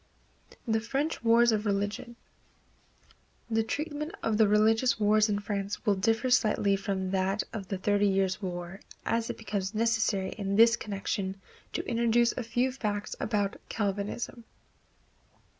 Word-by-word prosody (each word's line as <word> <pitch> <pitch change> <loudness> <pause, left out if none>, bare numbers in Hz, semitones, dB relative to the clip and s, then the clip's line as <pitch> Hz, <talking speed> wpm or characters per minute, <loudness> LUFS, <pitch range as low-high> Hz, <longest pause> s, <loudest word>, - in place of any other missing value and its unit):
The 220 -1 +2
French 275 +6 -2
Wars 235 +1 +5
of 215 -1 0
Religion. 205 +3 -2 1.4
The 225 0 +3
treatment 300 +6 -4
of 220 -1 +1
the 220 - +6
religious 220 +4 +3
wars 215 +1 +4
in 205 - +1
France 200 0 -4
will 205 - +4
differ 225 +6 +1
slightly 210 -4 +3
from 190 -1 -2
that 195 +2 0
of 200 -4 -5
the 195 - -3
Thirty 205 +2 +2
Years' 195 0 +1
War, 175 0 -5 0.3
as 230 0 0
it - - -4
becomes 205 -2 -3
necessary 220 -4 +1
in 200 -2 -3
this 230 +2 +7
connection 195 -2 -4 0.3
to - - -3
introduce 235 0 +3
a - - -4
few 245 +3 0
facts 210 -5 -3
about 205 -3 -1
Calvinism. 205 +3 -3
210 Hz, 140 wpm, -29 LUFS, 200-230 Hz, 1.4 s, this